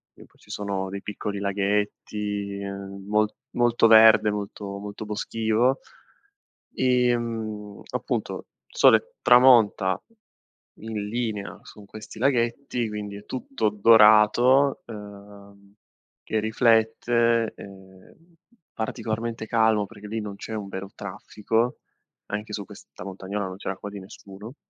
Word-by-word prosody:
e - - -15
poi - - -29
ci - - -23
sono 100 -2 -3
dei 100 0 -6
piccoli 100 -1 -5
laghetti, 100 0 -2
ehm, 100 0 -7
mol 105 0 +2 0.2
molto 120 -1 +3
verde, 110 -1 +7
molto 100 -1 -6
molto 105 +1 -7
boschivo. 110 +4 0 1.0
Ehm, 115 -5 -1
appunto, - - -3 0.3
sole - - +4
tramonta 115 -7 +5 0.8
in 110 -2 -5
linea 110 -3 -3
su 105 -1 -14
questi 110 +2 -11
laghetti, 120 -2 0
quindi 105 -1 -6
è 105 - -13
tutto 125 -4 -2
dorato, 110 +5 +5
ehm, 100 -2 -12 0.5
che 110 - -1
riflette, 115 0 +2
ehm, 95 -1 -14 0.6
particolarmente 115 0 -4
calmo 110 -2 +2
perché 105 0 -12
lì 110 +2 -3
non 105 -1 -6
c'è 110 - -8
un 105 -2 -5
vero 95 0 -6
traffico, 110 +4 -2 0.5
anche 105 +1 -5
su 100 -1 -4
questa 90 - -13
montagnola 100 +1 -5
non 95 - -7
c'era 95 -1 -5
quasi 100 0 -8
nessuno. 100 +5 -12
105 Hz, 115 wpm, -25 LUFS, 100-115 Hz, 1.0 s, verde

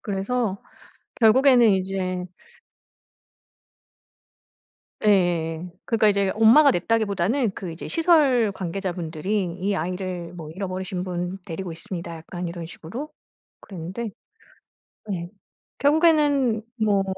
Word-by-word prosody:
그래서 200 +1 -2 0.6
결국에는 250 +2 +6
이제 185 -1 -2 2.8
예예예. 175 -4 +2
그러니까 225 -2 +3
이제 200 -1 +2
엄마가 240 +7 +6
냈다기보다는 215 +3 0
그 185 -3 -6
이제 165 - -8
시설 295 - +3
관계자분들이 185 +1 -3 0.2
"이 200 +2 0
아이를 180 0 -4
뭐 160 -3 -8
잃어버리신 185 0 -4
분 180 +1 -4
데리고 175 +1 -5
있습니다." 170 0 -7
약간 175 +2 -6
이런 170 -1 -6
식으로 210 - -7 0.5
그랬는데 190 +5 -6 1.0
예 175 -1 -5 0.5
결국에는 290 -6 +3 0.2
뭐 200 -2 +3
190 Hz, 255 characters per minute, -24 LUFS, 175-225 Hz, 2.8 s, 결국에는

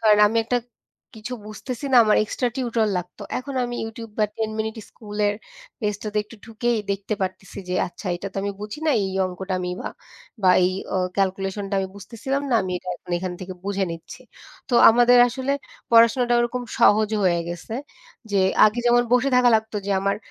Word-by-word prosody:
কারণ 215 -2 +5
আমি 225 +2 -1
একটা 245 +2 +1 0.6
কিছু 245 +4 -5
বুঝতেছি 230 +5 -7
না, - - +6
আমার 215 - +4
এক্সট্রা 245 +3 -1
টিউটর 235 -4 0
লাগতো। 180 +3 -6 0.2
এখন 275 +2 -7
আমি 240 0 -4
Youtube 225 -1 -8
বা 215 - +4
'10 220 -1 -1
Minute 220 +1 -3
School' 210 -2 -9
এর 205 - 0 0.5
পেজটাতে 210 0 -3
একটু 230 - -14
ঢুকেই 230 +1 -1
দেখতে 200 +2 -2
পারতেছি 190 +1 -5
যে 180 - -1
আচ্ছা 180 - -10
এইটা 175 +3 -6
তো - - -12
আমি 200 - -1
বুঝি 210 +5 -6
না, - - +4
এই 190 - -2 0.2
অঙ্কটা 185 +1 -4
আমি 180 - -3 0.2
আ - - 0 0.5
বা 185 - +6
এই 180 - +3 0.2
আ - - +2 0.2
ক্যালকুলেশনটা 195 +1 -1
আমি 190 0 -2
বুঝতেছিলাম 250 +7 -4
না - - +3
আমি 185 -1 -3
এটা 185 - -11
এখন - - -14
এখান 185 0 -4
থেকে 185 0 -6
বুঝে 200 -1 0
নিচ্ছি 165 0 -9 0.5
তো 245 - -1 0.2
আমাদের 245 +1 +5
আসলে 260 +3 -2 0.4
পড়াশোনাটা 235 +1 +5
ওরকম 240 +1 -1 0.2
সহজ 215 0 +5 0.2
হয়ে 175 -2 +3
গেছে। 175 +6 -6 0.6
যে 200 - 0 0.3
আগে 215 +3 +3
যেমন 240 0 +5
বসে 250 +2 +4
থাকা 250 -1 +5
লাগতো 220 0 -4
যে - - -2
আমার 200 +1 0
215 Hz, 190 wpm, -23 LUFS, 195-240 Hz, 0.6 s, না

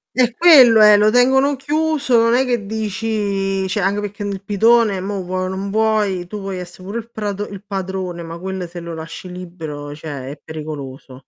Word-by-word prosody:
Eh 245 -2 +2
quello 265 -10 +7
è, 210 -1 +8
lo 210 +1 +4
tengono 265 +4 +4
chiuso, 295 -2 0
non 230 0 +3
è 255 +2 +4
che 240 -4 -1
dici 200 -2 -2
cioè 195 +2 -1
anche 195 +2 +1
perché 205 0 -6
nel 200 -2 -4
pitone 215 0 +3
mo' 195 +1 -3
vuoi 185 +1 -3
o - - -2
non 190 +1 -4
vuoi, 210 -4 +1
tu 210 +3 -6
puoi 195 -1 -5
essere 180 0 -9
pure 200 +4 -5
il 230 0 -11
prato 205 -2 -4
il 200 -2 -9
padrone, 190 -3 -4
ma 165 0 -8
quelle 190 0 -5
se 175 +1 -9
lo 170 -1 -7
lasci 165 +3 -8
libero 160 -5 -7
cioè, 145 -3 -7
è 145 - -10
pericoloso. 140 -4 -8
195 Hz, 195 wpm, -19 LUFS, 180-220 Hz, -, è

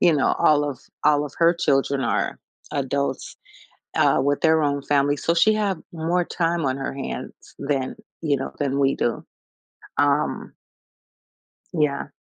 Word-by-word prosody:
you 175 -2 +5
know, 140 -3 +2
all 145 -1 +4
of 135 - -6 0.2
all 150 -1 +4
of 145 - -7
her 170 +1 +5
children 140 -4 +1
are 115 - -1 0.3
adults, 140 0 -2 0.6
uh, - - +4
with 145 +1 +1
their 160 -1 +4
own 140 -1 0
family, 145 0 +2
so, 170 - 0
she 215 +6 +5
have 200 -5 0
more 170 +2 0
time 170 -1 -1
on 130 -1 0
her 135 - -4
hands 135 - -7
than, 140 -2 -1 0.3
you 150 -3 +2
know, 135 - -5
than 140 -1 0
we 135 0 +3
do. 120 - -1 0.7
Um 145 0 +1 1.2
Yeah. 150 -3 0
145 Hz, 150 wpm, -23 LUFS, 140-165 Hz, 1.2 s, you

